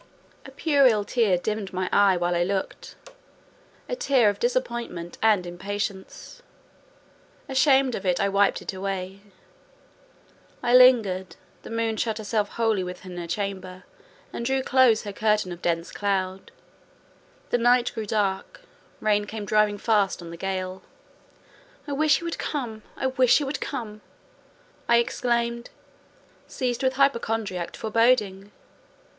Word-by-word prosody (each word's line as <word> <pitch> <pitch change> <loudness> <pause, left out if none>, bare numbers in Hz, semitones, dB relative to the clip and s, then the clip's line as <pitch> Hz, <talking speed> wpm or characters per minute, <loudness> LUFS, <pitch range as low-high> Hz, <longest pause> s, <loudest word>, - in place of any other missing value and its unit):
A - - -11
puerile 270 -7 +3
tear 215 -7 +2
dimmed 210 +1 -4
my 185 0 -2
eye 195 -2 +5
while 175 0 0
I 175 - +1
looked—a - - -8
tear 265 - +3
of - - -11
disappointment 235 - -3
and 210 -5 +3
impatience; 195 - -6 1.1
ashamed 265 -1 +3
of 195 - -4
it, 180 -2 +1
I 200 - +2
wiped 200 0 +2
it - - -5
away. 190 0 -4 1.4
I 240 0 +1
lingered; 225 -8 +5 0.3
the - - -11
moon 225 -1 -1
shut 220 -1 -1
herself 210 -1 -1
wholly 220 -4 +1
within 180 0 -8
her 170 -1 -5
chamber, 185 0 -4 0.5
and - - -4
drew 265 +2 0
close 255 -5 +4
her 205 -2 -6
curtain 210 -3 +1
of 175 0 -8
dense 170 0 -1
cloud: 190 -2 -2 1.0
the 245 - +2
night 245 +1 +3
grew 220 -2 -5
dark; 200 - -2 0.4
rain 210 -1 +2
came 215 0 -6
driving 210 0 +2
fast 205 -2 +1
on 170 -1 -9
the - - -7
gale. 185 +1 -4 1.1
"I - - -5
wish 300 +2 +3
he - - -9
would 335 -1 -4
come! 235 -7 -4 0.2
I - - -3
wish 260 -2 +4
he 295 - -1
would 275 0 -4
come!" 220 -6 -5 0.9
I 235 - +6
exclaimed, 235 0 -1 0.8
seized 245 -2 -2
with 260 -1 +1
hypochondriac 225 -9 0
foreboding. 215 -3 +1
215 Hz, 135 wpm, -25 LUFS, 190-245 Hz, 1.4 s, I